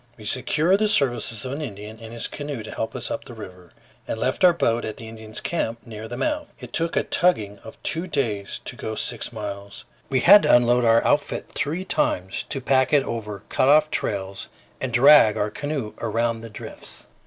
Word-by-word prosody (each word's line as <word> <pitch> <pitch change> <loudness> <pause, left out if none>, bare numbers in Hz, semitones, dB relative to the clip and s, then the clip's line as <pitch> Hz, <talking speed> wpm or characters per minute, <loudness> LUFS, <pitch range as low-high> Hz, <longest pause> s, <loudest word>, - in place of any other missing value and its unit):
We 110 - -12
secured 155 - +2
the 215 - +3
services 120 - +1
of 130 - -4
an 145 +3 -4
Indian 105 -4 -7
and 115 0 -9
his 115 -1 -2
canoe 145 -6 -6
to - - -8
help 110 +2 -4
us 125 - -4
up - - -4
the 120 - -10
river, 90 -5 -11 0.4
and - - -3
left 130 - -1
our 180 - +8
boat 120 -8 0
at 110 - -5
the 115 - -9
Indians' 110 -1 -5
camp 115 -9 -2
near 110 -1 -8
the 120 +2 -6
mouth. 300 0 -1
It - - -10
took 165 0 0
a - - +2
tugging 105 - +1
of 110 - -12
two 165 +3 -2
days 110 - -2
to - - -5
go 110 - -5
six 120 +2 -1
miles. 100 -3 -7 0.2
We 130 -1 +1
had 205 +3 +9
to - - +5
unload 120 0 +3
our 115 0 +4
outfit - - 0
three 165 +6 -2
times 95 - -1
to 135 - -3
pack 130 +1 +2
it 145 -2 +5
over 105 -5 -5
cut - - +2
off 155 +1 +5
trails, 95 -1 -3 0.3
and 130 - -3
drag 125 -3 +7
our 105 0 -1
canoe 145 -4 -4
around 115 0 -1
the 115 - -9
drifts. 105 - -7
115 Hz, 210 wpm, -23 LUFS, 110-145 Hz, 0.4 s, had